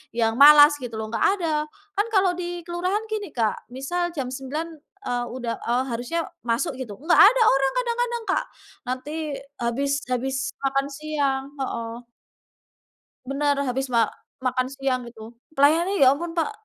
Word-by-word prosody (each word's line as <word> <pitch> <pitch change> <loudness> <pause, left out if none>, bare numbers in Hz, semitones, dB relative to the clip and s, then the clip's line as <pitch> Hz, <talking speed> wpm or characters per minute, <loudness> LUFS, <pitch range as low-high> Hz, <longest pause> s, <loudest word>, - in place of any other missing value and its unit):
yang 225 -1 +2
malas 295 +1 +9
gitu 230 -3 -6
loh. 220 0 -4
Nggak - - +1
ada. 305 -3 0 0.3
Kan 415 +3 +2
kalau 380 -2 +4
di 350 -1 -5
kelurahan 365 +5 -2
gini, 415 -5 -3
Kak. 220 -1 -1
Misal 345 +8 -2
jam 255 -2 -2
9 280 +5 -4 0.4
eee, 245 0 -1
udah 240 -2 -4
eee, 245 +2 0
harusnya 250 +9 -2 0.2
masuk 235 +3 0
gitu. 210 -5 -7
Nggak 325 - +5
ada 460 +4 +7
orang 270 0 +2
kadang-kadang, 480 -1 -1
Kak. - - 0 0.4
Nanti 255 +3 -4 0.5
habis 255 +4 0 0.2
habis 260 +2 -1 0.2
makan 275 0 0
siang 285 -2 -1 0.2
heeh. 235 -2 -4 1.2
Bener. 285 +1 +1
Habis 260 +1 -2
ma 230 -2 +3 0.3
makan 255 0 0
siang 270 -2 -1
itu. 225 0 -12 0.2
Pelayanannya, 320 +3 +4
ampun, 295 +6 +2
Pak 340 +6 +1
275 Hz, 150 wpm, -24 LUFS, 250-335 Hz, 1.2 s, malas